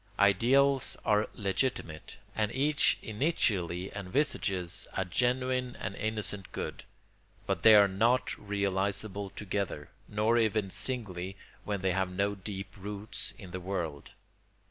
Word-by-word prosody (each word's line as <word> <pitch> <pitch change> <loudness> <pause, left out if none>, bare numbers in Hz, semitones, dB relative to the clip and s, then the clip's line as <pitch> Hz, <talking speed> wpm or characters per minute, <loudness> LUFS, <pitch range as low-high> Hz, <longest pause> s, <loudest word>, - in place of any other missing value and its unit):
Ideals 130 +7 +4
are 105 0 +3
legitimate, 95 -6 -2 0.2
and 105 0 +1
each 145 +2 +3
initially 100 - 0
envisages 100 - -1
a 95 - +1
genuine 125 +4 0
and 100 - -4
innocent 105 -3 -2
good; - - -5 0.6
but - - -1
they 110 -1 +9
are 100 -1 +8
not 115 +7 +2
realisable 100 0 -1
together, 95 -7 -4 0.2
nor 110 +3 +2
even 110 -3 +1
singly 95 -8 -2 0.3
when 100 -2 -2
they 95 0 +2
have 95 0 0
no 100 +2 0
deep 100 0 -7
roots 100 -1 -5
in 95 -3 -10
the 95 - -4
world. 85 -6 -4
100 Hz, 120 wpm, -31 LUFS, 95-110 Hz, 0.6 s, they